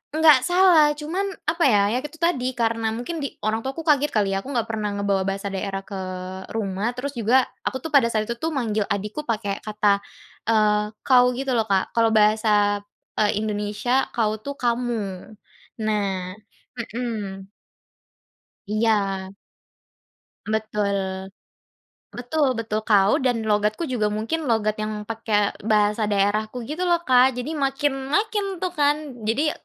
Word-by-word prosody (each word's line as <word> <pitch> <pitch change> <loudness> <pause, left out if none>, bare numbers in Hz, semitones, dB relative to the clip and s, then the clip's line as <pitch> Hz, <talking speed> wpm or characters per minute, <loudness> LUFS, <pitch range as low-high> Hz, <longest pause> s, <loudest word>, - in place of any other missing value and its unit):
Enggak 305 -5 +6
salah, 355 -4 +5
cuman 320 +6 -3 0.2
apa 335 0 +1
ya. 205 -5 +4
Ya 250 - +1
itu 295 +2 -9
tadi, 260 -7 +1
karena 225 -1 0
mungkin 245 +9 -4
di 275 - -5
orang 220 +1 0
tuaku 270 +4 -4
kaget 295 0 +3
kali 205 -3 +1
ya, - - 0
aku 280 - -7
enggak 235 -3 -1
pernah 215 -2 -2
ngebawa 200 -1 0
bahasa 195 +1 -2
daerah 195 0 -3
ke 200 - -7 0.6
rumah, 210 +1 -2
terus 275 +2 -5
juga 240 +3 +3 0.2
aku 260 - -2
tuh, 320 - -5
pada 245 -4 +6
saat 215 -1 0
itu 235 - -2
tuh, 325 +4 -1
manggil 220 -7 0
adikku 210 +9 -2
pakai 210 -3 -2
kata, 210 -1 +2 0.5
eee, 210 -1 +2 0.2
"kau" 250 -1 +6
gitu 270 0 -2
loh, 225 - +3
Kak. 195 +2 0
Kalau 230 -1 +3
bahasa, 210 -1 +3 0.4
eee, 210 -1 +2
Indonesia 210 +4 0
"kau" 215 -2 +1
tuh 280 +6 -6
"kamu," 235 -6 -2 0.5
nah 195 -4 -1 0.4
heeh. 225 -4 -4 1.3
Iya. 200 -3 0 1.1
Betul. 200 -3 -2 0.8
Betul 260 +3 0
betul. 220 -2 -2
Kau 200 -2 +4
dan 245 -4 0
logatku 210 +9 +1
juga 235 -5 0
mungkin 230 +10 -2
logat 215 -3 +1
yang 215 0 -3
pakai 215 -2 0
bahasa 210 0 +2
daerahku, 210 +4 0
gitu 310 +6 -3
loh, 345 -1 +2
Kak. 255 -3 +4
Jadi, 295 +6 -3
makin 270 0 -1
makin, 410 -3 0
tuh, 370 - 0
kan. 290 -5 0
Jadi, 280 +8 +1
225 Hz, 150 wpm, -23 LUFS, 210-265 Hz, 1.3 s, Enggak